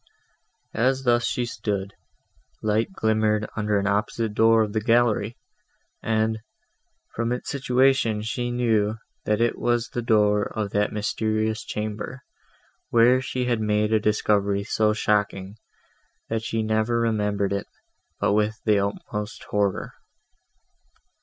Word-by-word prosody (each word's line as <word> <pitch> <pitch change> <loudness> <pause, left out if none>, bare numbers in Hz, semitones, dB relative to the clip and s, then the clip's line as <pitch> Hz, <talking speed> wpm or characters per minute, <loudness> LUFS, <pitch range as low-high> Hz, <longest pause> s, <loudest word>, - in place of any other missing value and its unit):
As 130 +3 +1
thus 120 -1 +2
she 125 - -1
stood, 105 -3 -3 0.7
light 110 - +1
glimmered 110 - +1
under 105 -1 0
an 100 - 0
opposite 105 +2 0
door 115 +1 +5
of 105 -1 -4
the 110 - 0
gallery, 115 -1 +2 0.6
and, 110 0 0 0.7
from 115 +1 -1
its 125 - -3
situation, 130 -5 +2
she 120 +2 -2
knew, 110 -3 +1 0.3
that 105 0 +1
it 120 0 +1
was 120 -1 0
the 120 - -3
door 105 -2 +3
of 105 -2 -2
that 105 0 +1
mysterious 110 +1 -1
chamber, 105 +5 -5 0.7
where 120 +2 +5
she 125 -1 -2
had 120 -3 0
made 105 0 +1
a 110 - +4
discovery 100 -1 +1
so 110 +1 +1
shocking, 100 -2 -1 0.7
that 115 -1 -1
she 115 0 -2
never 110 +2 +1
remembered 105 -3 0
it 100 - -3 0.5
but - - +2
with 105 +1 +1
the 105 -2 +4
utmost 105 +1 -4
horror. 100 -2 0
110 Hz, 130 wpm, -24 LUFS, 105-115 Hz, 0.7 s, door